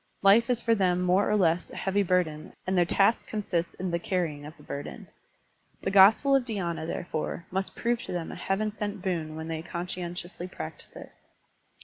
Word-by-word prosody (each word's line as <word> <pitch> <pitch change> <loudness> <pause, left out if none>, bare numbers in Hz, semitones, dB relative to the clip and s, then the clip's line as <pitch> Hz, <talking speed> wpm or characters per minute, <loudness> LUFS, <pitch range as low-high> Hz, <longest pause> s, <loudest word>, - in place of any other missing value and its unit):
Life 220 +5 +6
is 245 -2 +2
for 230 - +3
them 180 -4 +2
more 180 +3 +3
or 210 - +3
less 175 -3 +2
a - - -11
heavy 195 +1 +1
burden 175 -5 0
and 190 - 0
their 175 -1 +4
task 200 +5 +3
consists 185 -5 -2
in 185 -1 -3
the 170 - 0
carrying 160 -5 -2
of 155 0 -12
the 150 - -16
burden. 140 0 -7 0.8
The - - 0
gospel 210 +8 +7
of 270 - +3
dhySna, 175 -8 -3
therefore, 170 0 -4
must 190 +1 -2
prove 235 0 0
to - - -6
them 175 -2 -3
a - - -7
heaven 210 +2 -1
sent 205 -2 -5
boon 165 -5 -2
when 160 0 -6
they 160 -1 -3
conscientiously 175 +1 -5
practise 185 - -9
it. - - -10
180 Hz, 195 wpm, -28 LUFS, 170-200 Hz, 0.8 s, gospel